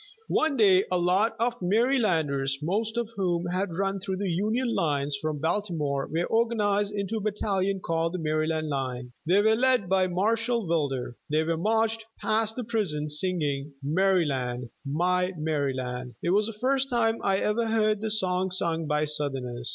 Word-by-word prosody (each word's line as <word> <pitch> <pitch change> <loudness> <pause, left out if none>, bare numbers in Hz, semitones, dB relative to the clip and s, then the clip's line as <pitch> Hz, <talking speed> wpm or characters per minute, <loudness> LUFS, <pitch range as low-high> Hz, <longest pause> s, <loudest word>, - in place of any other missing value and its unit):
One 310 -3 +2
day 195 -4 +5
a 180 - +1
lot 185 +6 +2
of 240 +1 -1
Marylanders, 175 - +1
most 215 +7 -1
of 235 -1 -2
whom 175 -3 0
had 180 +1 -1
run 195 0 0
through 190 0 -3
the 195 -2 -1
Union 220 +7 0
lines 145 -5 0
from 155 -1 -2
Baltimore, 160 -4 -1
were 165 +2 0
organized 210 -3 +1
into 205 +1 -2
a - - -3
battalion 200 -2 -1
called 165 0 -1
"The - - -1
Maryland 155 0 -1
Line." 130 -3 -3 0.2
They 195 +4 +4
were 220 +1 +4
led 250 -4 +2
by 190 0 +2
Marshall 225 +4 0
Wilder. 140 -7 -1
They 155 +1 +2
were 165 +1 0
marched 225 +5 +1 0.2
past 220 0 +1
the 250 - -3
prison, 185 -10 -2
singing 150 -4 -1
"Maryland, 140 -8 0
My 180 +6 0
Maryland." 130 -5 -2
It 170 - +1
was 205 +2 +3
the 225 - -5
first 270 +2 +1
time 230 -2 +1
I 195 -1 +2
ever 220 +3 0
heard 215 -2 +1
the 220 - -2
song 190 -3 0
sung 165 -3 0
by 150 0 +1
Southerners. 135 -5 -2
185 Hz, 165 wpm, -27 LUFS, 150-215 Hz, 0.2 s, day